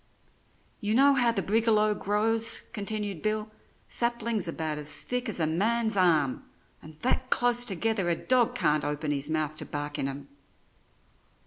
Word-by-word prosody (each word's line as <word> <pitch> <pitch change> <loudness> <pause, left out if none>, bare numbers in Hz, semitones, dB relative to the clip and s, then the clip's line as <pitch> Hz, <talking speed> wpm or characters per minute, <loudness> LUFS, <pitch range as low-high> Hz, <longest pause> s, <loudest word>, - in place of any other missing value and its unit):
"You 210 0 -1
know 280 +3 +6
how 245 -3 +3
the 230 - -1
brigalow 215 0 +2
grows," 220 +3 +1
continued 205 -4 -3
Bill; 215 0 -2 0.4
"saplings 235 -4 0
about 160 -2 -3
as 150 0 +2
thick 250 -1 -3
as 205 - -3
a 160 - +2
man's 220 +7 0
arm, 160 -8 +2 0.4
and 155 0 -13
that 255 +1 0
close 245 0 +2
together 205 -2 0
a 170 - +2
dog 245 +4 +1
can't 150 - +1
open 150 +1 -2
his 145 +1 -2
mouth 155 -1 -1
to - - -6
bark 145 0 -5
in 135 - -1
'em. 140 +1 -7
210 Hz, 155 wpm, -28 LUFS, 155-230 Hz, 0.4 s, know